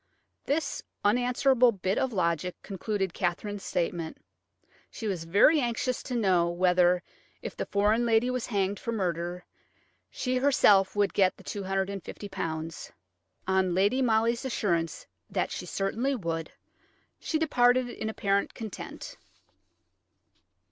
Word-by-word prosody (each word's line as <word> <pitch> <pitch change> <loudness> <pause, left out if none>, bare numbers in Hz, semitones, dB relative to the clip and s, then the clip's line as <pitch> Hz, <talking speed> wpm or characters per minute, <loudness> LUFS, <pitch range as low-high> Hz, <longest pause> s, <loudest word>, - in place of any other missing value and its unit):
This 285 0 -1 0.2
unanswerable 250 +2 +4
bit 190 -1 -1
of 265 - 0
logic 175 -3 -1
concluded 195 -1 -3
Katherine's 195 +3 -2
statement. 170 -3 -2 0.7
She 225 - -8
was 185 -6 -2
very 205 - +5
anxious 245 0 -1
to 250 - -5
know 185 -6 +3
whether, 180 0 +3 0.4
if - - -6
the - - -4
foreign 210 +4 +2
lady 235 +1 +3
was 250 -2 -2
hanged 200 -3 -1
for 230 - -4
murder, 175 -4 -2 0.6
she 255 0 -2
herself 210 -8 +4
would 205 -1 +2
get 190 -2 +3
the - - -15
£250. 190 -4 -4 0.6
On 190 -2 +2
Lady 205 +8 +2
Molly's 230 -1 +2
assurance 175 -10 -1 0.2
that - - -1
she - - -5
certainly 235 +8 -1
would, 165 -7 -3 0.7
she 320 - -1
departed 250 -5 +3
in 220 -2 -5
apparent 200 -2 0
content. 220 -3 -8
200 Hz, 120 wpm, -28 LUFS, 180-240 Hz, 0.7 s, very